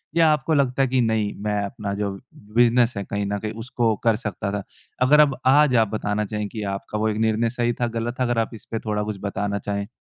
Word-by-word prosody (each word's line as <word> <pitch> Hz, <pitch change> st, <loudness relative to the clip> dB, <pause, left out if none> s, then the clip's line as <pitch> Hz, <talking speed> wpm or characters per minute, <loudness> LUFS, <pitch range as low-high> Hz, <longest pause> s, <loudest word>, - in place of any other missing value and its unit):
या 165 Hz, -1 st, +5 dB
आपको 150 Hz, +2 st, -1 dB
लगता 135 Hz, -2 st, +2 dB
है 135 Hz, -, +3 dB
कि 130 Hz, 0 st, +2 dB
नहीं 110 Hz, -2 st, 0 dB
मैं 105 Hz, -1 st, 0 dB
अपना 100 Hz, 0 st, -4 dB
जो 100 Hz, 0 st, -2 dB, 0.2 s
बिज़नेस 120 Hz, 0 st, +2 dB
है, 100 Hz, -, -2 dB
कहीं 100 Hz, +1 st, -3 dB
न 100 Hz, +1 st, -1 dB
कहीं 110 Hz, +1 st, -4 dB
उसको 115 Hz, 0 st, -1 dB
कर 115 Hz, -2 st, +4 dB
सकता 100 Hz, -2 st, -4 dB
था। 100 Hz, -1 st, -3 dB, 0.4 s
अगर 145 Hz, +4 st, +6 dB
अब 145 Hz, -4 st, +5 dB
आज 140 Hz, 0 st, +5 dB
आप 110 Hz, -2 st, +4 dB
बताना 105 Hz, 0 st, -1 dB
चाहें 105 Hz, 0 st, -3 dB
कि 110 Hz, -2 st, -5 dB
आपका 100 Hz, +2 st, -6 dB
वो 110 Hz, +1 st, +1 dB
एक 105 Hz, -, -2 dB
निर्णय 110 Hz, +1 st, +1 dB
सही 120 Hz, 0 st, 0 dB
था, 120 Hz, -, +2 dB
गलत 115 Hz, +1 st, -3 dB
था 130 Hz, -, +2 dB
अगर 120 Hz, -2 st, +1 dB
आप 115 Hz, +1 st, -1 dB
इसपे 115 Hz, 0 st, -6 dB
थोड़ा 105 Hz, -1 st, -1 dB
कुछ 105 Hz, -1 st, -4 dB
बताना 100 Hz, 0 st, -2 dB
चाहें? 100 Hz, 0 st, -3 dB
110 Hz, 240 wpm, -23 LUFS, 105-120 Hz, 0.4 s, अगर